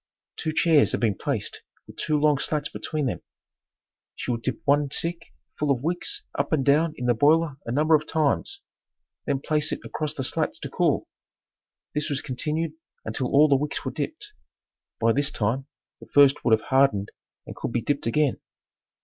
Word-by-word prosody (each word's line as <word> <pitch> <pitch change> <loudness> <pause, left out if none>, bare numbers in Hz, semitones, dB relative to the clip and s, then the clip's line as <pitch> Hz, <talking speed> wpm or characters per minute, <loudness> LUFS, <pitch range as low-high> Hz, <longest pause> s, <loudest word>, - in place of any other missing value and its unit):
Two 155 - -2
chairs 155 -2 +4
had - - 0
been 110 -4 +2
placed - - -3 0.2
with - - -14
two 150 -1 0
long 150 -1 +3
slats 150 0 -1
between 155 -2 -3
them. 125 - -2 0.9
She - - -3
would 115 -1 -2
dip 125 -1 -2
one 145 0 +3
stick 170 +3 -4 0.3
full 150 - 0
of 130 -2 +1
wicks 180 - -2
up - - -2
and 145 -5 +1
down 155 +3 +3
in 125 - -4
the 120 - +4
boiler 150 +4 +3
a - - -2
number 155 +5 +2
of 150 -1 +3
times, 160 - 0 0.7
then 140 -2 0
place 150 0 0
it - - -3
across 155 -1 -3
the 135 - -3
slats - - -1
to - - -5
cool. - - +1 0.9
This 150 0 -1
was 140 -2 -1
continued 150 +6 -2 0.3
until 115 +3 -2
all 145 +4 +5
the 140 - +4
wicks 145 +2 -2
were 130 - -2
dipped. 325 - -5 0.7
By 115 0 +3
this 140 +2 +1
time, 120 +6 -1 0.3
the - - -13
first 140 0 +5
would 115 - +3
have - - -14
hardened 130 -7 +3 0.3
and - - -9
could - - -4
be 120 -1 -1
dipped 140 0 -1
again. 145 +3 +1
145 Hz, 185 wpm, -25 LUFS, 130-155 Hz, 0.9 s, all